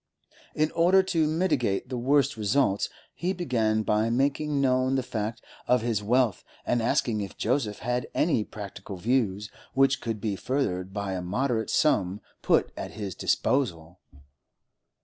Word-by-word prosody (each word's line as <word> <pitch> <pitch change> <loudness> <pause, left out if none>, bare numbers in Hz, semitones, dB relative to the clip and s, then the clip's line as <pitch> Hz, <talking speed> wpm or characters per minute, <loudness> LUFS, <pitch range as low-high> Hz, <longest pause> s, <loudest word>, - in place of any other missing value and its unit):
In 155 +1 +1
order 180 +3 +4
to 165 -4 +1
mitigate 150 - 0
the 130 - -3
worst 140 +2 +2
results, 105 -1 +1 0.2
he 180 +2 -2
began 115 - 0
by 105 +1 +1
making 140 +4 +1
known 130 0 +2
the 130 - 0
fact 115 -1 -4 0.2
of 125 -2 +3
his 115 -3 0
wealth 115 -2 +1 0.2
and 120 - +1
asking 115 -1 +1
if 100 - -7
Joseph 115 -3 0
had 125 0 -1
any 150 -10 +2
practical 100 -2 -8
views 105 -1 0 0.2
which 135 0 +3
could 115 -2 -3
be 100 -1 -2
furthered 95 -7 -2
by 100 -1 -3
a 90 - -3
moderate 110 +5 -1
sum 100 -10 +2 0.2
put - - +2
at - - -6
his 100 -3 -5
disposal. 90 - -1
120 Hz, 150 wpm, -27 LUFS, 105-135 Hz, 0.2 s, order